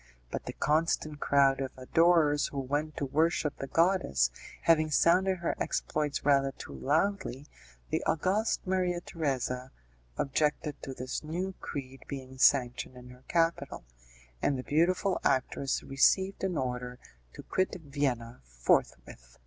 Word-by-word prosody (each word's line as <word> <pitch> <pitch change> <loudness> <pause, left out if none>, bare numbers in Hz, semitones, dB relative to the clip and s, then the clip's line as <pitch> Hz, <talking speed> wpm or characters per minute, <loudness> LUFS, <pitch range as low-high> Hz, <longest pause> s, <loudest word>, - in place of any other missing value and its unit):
But - - -5
the - - -4
constant 155 -1 0
crowd 135 -1 +3
of 135 -1 -5
adorers 150 +2 +3
who 140 - -8
went 145 +3 -2
to 140 - -1
worship 155 +1 +1
the 135 - -5
goddess, 165 - +2 0.3
having 155 -2 +4
sounded 185 +5 +3
her 170 -1 -2
exploits 150 -2 -2
rather 140 -1 +3
too - - -10
loudly, 155 -3 -1 0.5
the - - 0
august 190 +9 0
Maria 185 -2 0
Theresa 130 -6 -3 0.5
objected 150 +1 -1
to 135 - -6
this 130 +4 -4
new 180 +5 -3
creed 135 -2 -6
being 130 -1 -7
sanctioned 125 -2 +3
in 125 0 -12
her 125 +1 -17
capital, 165 0 0 0.6
and 140 - +1
the 130 - -5
beautiful 180 +6 +1
actress 135 +1 0
received 190 +9 +2
an 185 -4 0
order 125 -1 -3 0.4
to - - -10
quit 185 0 -1
Vienna 135 - -2
forthwith. - - -1
145 Hz, 135 wpm, -30 LUFS, 130-170 Hz, 0.6 s, having